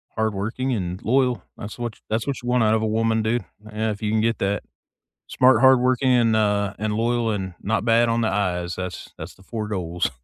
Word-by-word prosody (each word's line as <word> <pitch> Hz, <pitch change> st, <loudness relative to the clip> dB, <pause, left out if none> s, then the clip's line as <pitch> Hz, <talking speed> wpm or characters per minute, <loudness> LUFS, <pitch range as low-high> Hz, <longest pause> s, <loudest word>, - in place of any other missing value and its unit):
hardworking 110 Hz, +4 st, -1 dB
and 90 Hz, -4 st, -4 dB
loyal. 125 Hz, -3 st, +1 dB
That's 100 Hz, -, -8 dB
what 120 Hz, -2 st, -4 dB
ch -, -, -26 dB
that's 110 Hz, +1 st, -1 dB
what 140 Hz, -, -1 dB
you 120 Hz, -, -8 dB
want 125 Hz, -1 st, +3 dB
out 110 Hz, 0 st, +3 dB
of 110 Hz, -, 0 dB
a 110 Hz, -, 0 dB
woman, 110 Hz, +1 st, +1 dB
dude. 115 Hz, +2 st, 0 dB, 0.2 s
Yeah, 110 Hz, +1 st, -2 dB
if 105 Hz, +1 st, -7 dB
you 105 Hz, -1 st, -1 dB
can 110 Hz, 0 st, +2 dB
get 115 Hz, +1 st, +1 dB
that. 100 Hz, +1 st, -1 dB, 0.6 s
Smart, 130 Hz, +1 st, +4 dB
hardworking, 130 Hz, 0 st, +4 dB
and, 115 Hz, -3 st, +3 dB
uh 105 Hz, -2 st, +1 dB
and 105 Hz, 0 st, -1 dB
loyal 115 Hz, +1 st, 0 dB
and 95 Hz, -3 st, -3 dB
not 110 Hz, +1 st, -1 dB
bad 115 Hz, 0 st, +4 dB
on 115 Hz, 0 st, +1 dB
the 115 Hz, -, +1 dB
eyes, 90 Hz, -3 st, -1 dB
that's 90 Hz, -1 st, -6 dB
that's 80 Hz, +4 st, -8 dB
the -, -, -21 dB
4 110 Hz, +1 st, -5 dB
goals. 90 Hz, -7 st, -2 dB
110 Hz, 225 wpm, -23 LUFS, 100-120 Hz, 0.6 s, Smart